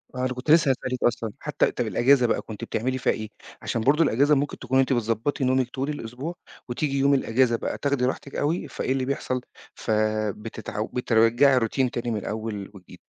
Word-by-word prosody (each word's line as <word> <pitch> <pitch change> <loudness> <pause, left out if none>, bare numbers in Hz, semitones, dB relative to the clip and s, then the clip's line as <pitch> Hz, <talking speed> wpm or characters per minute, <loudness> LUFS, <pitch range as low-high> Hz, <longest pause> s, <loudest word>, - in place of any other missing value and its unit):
آه - - -5
أنا 130 - -1
كنت 125 +4 -2
لسه 155 -4 +6
هاسألِك 130 -1 -3
أصلًا 115 -2 0
حتّى - - 0
طب - - -2
الأجازة 130 0 +4
بقى - - 0
كنتِ 110 -2 -9
بتعملي 130 +3 -2
فيها - - +1
إيه، 110 -1 -6 0.3
عشان 115 - -2
برضو 145 +7 +4
الأجازة 145 +2 +3
مُمكن 145 +1 -2
تكوني 130 +1 +2
أنتِ 135 0 +1
بتضبّطي 115 +4 -1
نومِك 130 -1 +2
طول 135 +3 -3
الأسبوع، 140 +4 -5 0.3
وتيجي 140 +3 -1
يوم 140 +1 +4
الأجازة 125 -2 +2
بقى - - -3
تاخدي 140 -3 0
راحتِك 135 +2 -4
أوي 155 +4 -1
فإيه - - -3
اللي 130 -1 0
بيحصل، 130 -1 -2 0.3
فَبتتعو 110 0 -2
بترجّعي 125 +2 +3
الroutine 125 +3 0
تاني 120 0 -3
من 110 - -1
الأول 105 -1 -5
وجديد، 95 -3 -14
125 Hz, 185 wpm, -25 LUFS, 115-135 Hz, 0.3 s, لسه